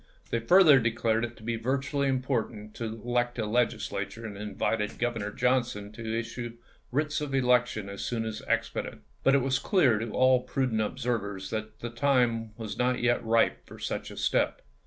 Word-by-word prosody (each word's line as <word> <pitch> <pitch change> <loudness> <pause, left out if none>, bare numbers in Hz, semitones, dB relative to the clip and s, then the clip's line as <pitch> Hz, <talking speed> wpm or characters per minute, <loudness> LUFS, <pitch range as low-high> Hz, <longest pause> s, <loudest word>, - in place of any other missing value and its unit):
They 115 - +1
further 155 +3 +7
declared 115 -1 +1
it 120 0 -4
to - - -14
be 115 +1 -1
vitally 135 +4 0
important 120 -5 -2
to 115 - -3
elect 120 +2 -1
a 110 - -1
Legislature 115 -2 -1
and 105 -2 -6
invited 105 +1 -2
Governor 115 -4 -1
Johnson 120 -5 0
to 115 +1 -3
issue 120 0 -6 0.3
writs 150 +3 0
of 140 -2 -2
election 125 -5 +2
as 100 0 -6
soon 115 -2 -2
as 110 -1 -4
expedient. - - -2 0.2
But 135 - +4
it 135 - +3
was 135 -1 +1
clear 140 - +3
to 115 +1 -3
all 130 +2 +4
prudent 125 -3 0
ob 110 +4 -2
servers 105 -6 -2
that 110 -1 -5
the 120 - -4
time 120 -4 +1
was 110 -3 -6
not 125 0 +2
yet 120 0 +2
ripe 115 0 +2
for - - -11
such - - -4
a - - -10
step. - - +1
120 Hz, 180 wpm, -28 LUFS, 110-125 Hz, 0.3 s, further